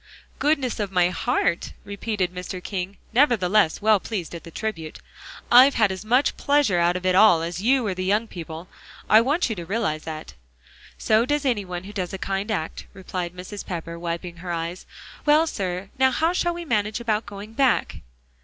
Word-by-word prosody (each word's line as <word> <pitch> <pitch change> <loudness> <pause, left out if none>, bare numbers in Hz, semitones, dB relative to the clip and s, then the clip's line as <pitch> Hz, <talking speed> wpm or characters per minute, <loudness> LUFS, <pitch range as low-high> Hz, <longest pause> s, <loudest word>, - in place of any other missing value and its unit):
"Goodness 280 -6 +1
of 205 -2 -2
my 180 -2 +3
heart," 185 -2 -1
repeated 200 -3 -2
Mr. 180 +1 -6
King, 195 0 -4 0.2
nevertheless 215 - +3
well 215 -1 +5
pleased 185 -5 -5
at 170 - -7
the - - -10
tribute. 165 -4 -5 0.5
"I've 255 +3 +8
had 215 -4 +3
as 190 +1 -6
much 250 +6 +2
pleasure 280 -11 +2
out 170 +1 +2
of 180 0 -4
it 185 - +3
all 185 -4 +6
as 170 +2 -4
you 255 +2 +3
or 200 - 0
the 185 0 -4
young 205 +4 +1
people. 165 -2 -8 0.4
I 220 - +7
want 290 +9 +1
you 225 - -3
to 175 - -6
realize 185 -4 -1
that." 155 -1 -7 0.6
"So 220 +1 +3
does 290 +3 -1
any 230 -7 +1
one 180 -1 -5
who 205 +2 -10
does 185 -3 -3
a - - -3
kind 195 +2 -3
act," 165 -7 -3
replied 180 -2 -5
Mrs. 185 +3 -7
Pepper, 170 -1 -6
wiping 170 0 -5
her 175 +1 -6
eyes; 170 +2 -4 0.4
"well, 305 +2 +5
sir, 190 - -4
now 265 0 +5
how 325 +6 +1
shall 345 -1 0
we 345 0 -6
manage 215 -4 0
about 220 -2 -1
going 205 +2 -9
back?" 265 0 +1
200 Hz, 190 wpm, -24 LUFS, 180-230 Hz, 0.6 s, I've